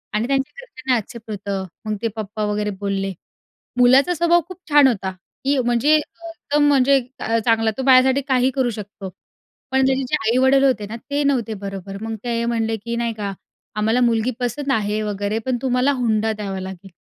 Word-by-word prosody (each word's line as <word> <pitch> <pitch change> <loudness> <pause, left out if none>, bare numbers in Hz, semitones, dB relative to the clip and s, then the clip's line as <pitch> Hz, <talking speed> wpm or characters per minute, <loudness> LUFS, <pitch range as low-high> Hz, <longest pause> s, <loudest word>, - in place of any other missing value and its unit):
आणि 220 +3 0
त्यांच्या 270 0 0
घरच्यांना 260 - -2
एक्सेप्ट 230 +1 -8
होतं. 200 -1 -3 0.2
मग 215 0 -1
ते 230 - +1
पप्पा 215 0 -4
वगैरे 210 0 -1
बोलले 195 -1 -2 0.7
मुलाचा 265 +7 +5
स्वभाव 345 +1 +3
खूप 370 -1 -10
छान 290 -2 +7
होता, 195 -6 -1 0.3
की 280 +1 +2
म्हणजे 240 +5 +3
एकदम 310 -2 -1
म्हणजे 275 -1 +4 0.5
चांगला 225 -1 +3
तो 265 - -2
माझ्यासाठी 260 +1 +5
काही 260 -1 +2
करू 260 -2 +1
शकतो. 200 -1 -8 0.6
पण 265 0 +3
त्याचे 265 0 +1
जे - - +2
आई-वडील 260 +4 +4
होते 255 -6 +2
ना 220 - -6
ते 285 +1 0
नव्हते 250 -6 0
बरोबर. 195 0 -6
मग 225 0 -4
ते 235 -1 -1
हे 235 - -1
म्हणले, 225 -1 0
की 235 +3 -5
नाही 235 -1 -1
का 200 -2 -3 0.4
आम्हाला 220 +3 +1
मुलगी 235 0 +2
पसंद 255 +3 -2
आहे 215 -3 0
वगैरे 205 +1 -2
पण 255 -1 0
तुम्हाला 255 +1 +2
हुंडा 220 -2 +1
द्यावा 200 -3 -5
लागेल. 190 0 -8
235 Hz, 180 wpm, -21 LUFS, 210-265 Hz, 0.7 s, छान